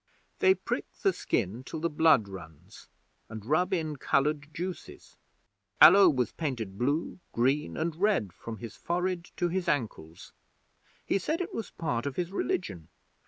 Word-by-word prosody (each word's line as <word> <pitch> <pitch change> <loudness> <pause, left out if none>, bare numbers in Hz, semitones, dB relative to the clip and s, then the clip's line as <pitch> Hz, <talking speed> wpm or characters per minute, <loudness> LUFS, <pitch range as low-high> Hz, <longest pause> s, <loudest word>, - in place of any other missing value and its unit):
'They 380 0 +5
prick - - -4
the 390 -2 +4
skin 105 +7 -2
till 160 - -6
the 165 - 0
blood 155 -8 +4
runs, 90 0 -12 0.4
and 110 -1 -8
rub 180 - +1
in 160 -5 -1
coloured 150 +3 0
juices. 180 +4 -7 0.6
Allo 190 +3 +9
was 125 -7 0
painted 120 -11 -4
blue, 145 - -1
green, 125 - +1
and 165 -1 -1
red 175 - +1
from 115 -1 -8
his 115 0 -8
forehead 175 0 -2
to 175 - +1
his 185 +1 -2
ankles. 105 - -3 0.7
He - - +1
said 315 - -2
it 370 +2 -4
was 225 - -4
part 135 -6 -3
of 140 - -4
his 175 0 -2
religion. 125 - -3
150 Hz, 155 wpm, -29 LUFS, 115-175 Hz, 0.7 s, Allo